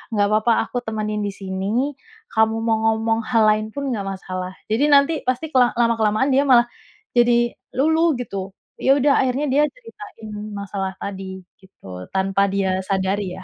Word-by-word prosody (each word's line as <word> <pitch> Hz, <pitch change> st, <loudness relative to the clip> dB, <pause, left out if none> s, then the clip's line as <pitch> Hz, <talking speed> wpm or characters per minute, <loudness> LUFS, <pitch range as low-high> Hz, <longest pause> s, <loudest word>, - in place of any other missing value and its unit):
nggak 205 Hz, -1 st, +2 dB
papa, 215 Hz, +2 st, +3 dB, 0.2 s
aku 245 Hz, -, -2 dB
temenin 215 Hz, -1 st, -3 dB
di 200 Hz, -, -2 dB
sini, 200 Hz, +8 st, -2 dB, 0.4 s
kamu 220 Hz, 0 st, +2 dB
mau 225 Hz, -1 st, +2 dB
ngomong 225 Hz, 0 st, 0 dB
hal 230 Hz, -3 st, +3 dB
lain 215 Hz, 0 st, -1 dB
pun 280 Hz, -1 st, -3 dB
nggak 215 Hz, -5 st, -2 dB
masalah." 185 Hz, -1 st, -5 dB, 0.2 s
Jadi 235 Hz, +6 st, +2 dB
nanti 280 Hz, +2 st, +5 dB
pasti 260 Hz, +5 st, -1 dB
kela 250 Hz, -2 st, +4 dB
lama-kelamaan 230 Hz, +2 st, +2 dB
dia 275 Hz, +2 st, +4 dB
malah 240 Hz, -2 st, +6 dB, 0.5 s
jadi 240 Hz, 0 st, +4 dB, 0.2 s
luluh, 320 Hz, +5 st, +3 dB
gitu. 195 Hz, -5 st, -5 dB, 0.3 s
Ya, 270 Hz, +1 st, +4 dB
udah, 280 Hz, +1 st, +3 dB
akhirnya 260 Hz, +3 st, 0 dB
dia 290 Hz, +3 st, +4 dB
ceritain 420 Hz, -, -12 dB, 0.3 s
masalah 195 Hz, -1 st, -4 dB
tadi, 190 Hz, -1 st, -6 dB, 0.2 s
gitu. 95 Hz, -, -11 dB
Tanpa 195 Hz, +1 st, +2 dB
dia 190 Hz, -1 st, 0 dB
sadari, 190 Hz, 0 st, -1 dB
ya. 190 Hz, -, -10 dB
220 Hz, 160 wpm, -21 LUFS, 195-255 Hz, 0.5 s, malah